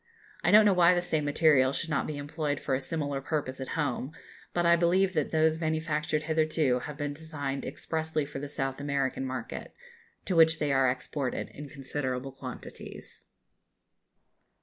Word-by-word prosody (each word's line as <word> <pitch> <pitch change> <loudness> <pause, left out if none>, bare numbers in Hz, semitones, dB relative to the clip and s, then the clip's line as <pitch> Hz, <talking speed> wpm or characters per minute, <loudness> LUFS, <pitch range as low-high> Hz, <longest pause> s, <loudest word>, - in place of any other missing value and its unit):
I - - +3
don't 210 +1 +8
know 205 - +5
why 180 0 +5
the 175 - +1
same 155 -4 0
material 145 -3 +4
should 165 +2 -3
not 140 - 0
be 150 - -4
employed 145 0 -2
for 135 - -2
a 130 - +1
similar 145 -1 -2
purpose 140 -3 -3
at 130 - -4
home; 140 -1 -1 0.4
but 175 0 0
I 170 0 +6
believe 185 +3 +3
that 155 -5 0
those 160 0 +2
manufactured 155 -1 -1
hitherto 155 -4 +1
have 150 +3 -7
been 145 -1 -2
designed 145 -3 -4
expressly 160 -2 -2
for 140 -1 -7
the 145 0 -6
South 135 -1 -3
American 140 -2 -1
market, 130 -3 -6 0.5
to 185 - -1
which 160 -1 +6
they 150 -2 0
are 135 -1 +4
exported 130 +1 -3
in 145 0 -9
considerable 135 -2 -3
quantities. 135 - -9
150 Hz, 170 wpm, -29 LUFS, 135-160 Hz, 0.5 s, don't